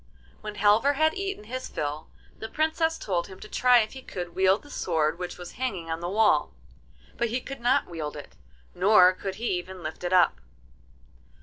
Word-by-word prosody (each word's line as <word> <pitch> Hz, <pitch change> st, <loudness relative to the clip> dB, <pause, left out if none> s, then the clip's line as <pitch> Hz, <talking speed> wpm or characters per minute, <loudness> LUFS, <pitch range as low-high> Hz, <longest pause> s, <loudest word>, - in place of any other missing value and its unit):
When 210 Hz, -1 st, -6 dB
Halvor 210 Hz, +7 st, +4 dB
had 315 Hz, +2 st, +2 dB
eaten 390 Hz, -, -4 dB
his 255 Hz, +4 st, -6 dB
fill, 150 Hz, +1 st, -4 dB, 0.3 s
the 220 Hz, -, -6 dB
Princess 320 Hz, +1 st, 0 dB
told 175 Hz, -4 st, -2 dB
him 190 Hz, -1 st, -12 dB
to -, -, -10 dB
try 250 Hz, +1 st, +4 dB
if 215 Hz, -, -4 dB
he 265 Hz, -, -9 dB
could 175 Hz, -8 st, -6 dB
wield 190 Hz, +2 st, +3 dB
the 290 Hz, -, -14 dB
sword 160 Hz, -, 0 dB
which 180 Hz, -1 st, -5 dB
was 175 Hz, -1 st, -9 dB
hanging 185 Hz, -11 st, -3 dB
on 160 Hz, -, -2 dB
the 175 Hz, +1 st, -4 dB
wall, 200 Hz, -, +2 dB, 0.6 s
but 235 Hz, -, 0 dB
he 240 Hz, +3 st, -1 dB
could 275 Hz, 0 st, -8 dB
not 255 Hz, +4 st, +3 dB
wield 160 Hz, -4 st, -5 dB
it, -, -, -11 dB, 0.4 s
nor 185 Hz, -1 st, +6 dB
could 190 Hz, +1 st, -5 dB
he 230 Hz, +4 st, -3 dB
even 185 Hz, 0 st, -10 dB
lift 155 Hz, +3 st, -6 dB
it 175 Hz, -, -2 dB
up. 175 Hz, -, +4 dB
195 Hz, 195 wpm, -27 LUFS, 175-250 Hz, 0.6 s, nor